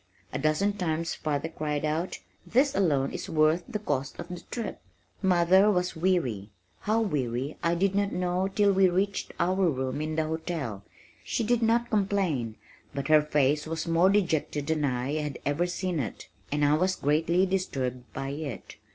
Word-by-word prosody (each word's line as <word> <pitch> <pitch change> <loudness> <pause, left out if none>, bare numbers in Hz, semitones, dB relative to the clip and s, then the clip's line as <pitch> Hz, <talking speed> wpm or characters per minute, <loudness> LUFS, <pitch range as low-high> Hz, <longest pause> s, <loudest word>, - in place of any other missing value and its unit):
A - - -1
dozen 155 +8 +2
times 165 -4 -1
father 150 0 -2
cried 150 -2 -2
out, 160 +4 -1 0.3
"This 270 +4 +2
alone 145 - +2
is - - -6
worth 155 +2 +3
the 230 - -2
cost 145 -9 -3
of 170 - -6
the 180 -1 -6
trip." 230 -4 -5 0.4
Mother 190 +2 +5
was 180 -3 0
weary, 160 - 0 0.3
how 215 +2 +1
weary 135 - -1
I 170 +1 +2
did 190 +2 +1
not 200 0 +1
know 180 +1 0
till 200 0 +3
we 190 -1 +5
reached 195 +3 -1
our 185 +3 +2
room 130 0 -2
in 155 0 -2
the 160 0 +1
hotel. 155 - -3 0.4
She - - -1
did 240 +1 +2
not 235 +1 +2
complain 190 - 0 0.4
but 140 +2 -3
her 155 -1 +7
face 150 0 +1
was 160 +1 -3
more 165 +3 +4
dejected 160 -7 +1
than 155 -1 0
I 130 +1 -1
had 150 -2 -4
ever 145 +5 +1
seen 180 -2 -2
it, 120 - -5 0.2
and 145 0 +2
I 145 - +4
was 185 +4 +2
greatly 165 +6 +2
disturbed 130 -10 -2
by 135 0 -4
it. 140 -3 -6
165 Hz, 175 wpm, -28 LUFS, 145-190 Hz, 0.4 s, her